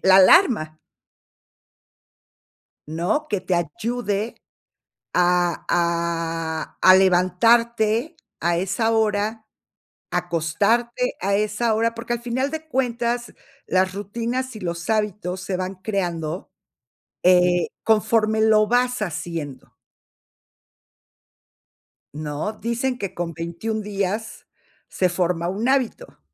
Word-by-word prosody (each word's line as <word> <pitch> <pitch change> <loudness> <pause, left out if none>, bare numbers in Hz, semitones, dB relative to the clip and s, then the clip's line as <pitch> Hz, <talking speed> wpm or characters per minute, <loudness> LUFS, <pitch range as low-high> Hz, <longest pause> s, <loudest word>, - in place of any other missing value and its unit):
la 190 0 +8
alarma. 190 - +5 2.1
¿No? 175 - -1
Que 205 - -1
te 185 0 -1
ayude 210 +6 -2 0.8
a 175 -1 +2
a 165 -2 -1
a 185 - +8
levantarte 220 - +3 0.2
a 170 +1 +1
esa 200 +5 0
hora, 220 0 0 0.7
acostarte 205 +9 0
a 200 +1 +1
esa 215 +2 0
hora, 230 +1 +1
porque 235 +1 -3
al 240 - -3
final 255 +3 -1
de 315 0 -6
cuentas, 240 -3 -1 0.3
las 185 0 +1
rutinas 235 +6 -3
y - - -7
los 170 -2 -5
hábitos 210 -4 -1
se 185 0 -3
van 185 +1 -4
creando, 175 -4 -3 0.7
eh, 180 -1 +4 0.2
conforme 220 0 +2
lo 215 -1 +4
vas 245 +1 +1
haciendo. 165 -6 -5 2.4
¿No? 150 +6 -3
Dicen 235 +3 -2
que 200 - -5
con 170 -1 -4
21 170 +7 -4
días 205 +2 -3 0.4
se 185 - +1
forma 175 -1 -1
un 210 +6 -1
hábito. 270 - -1
205 Hz, 105 wpm, -22 LUFS, 175-230 Hz, 2.4 s, la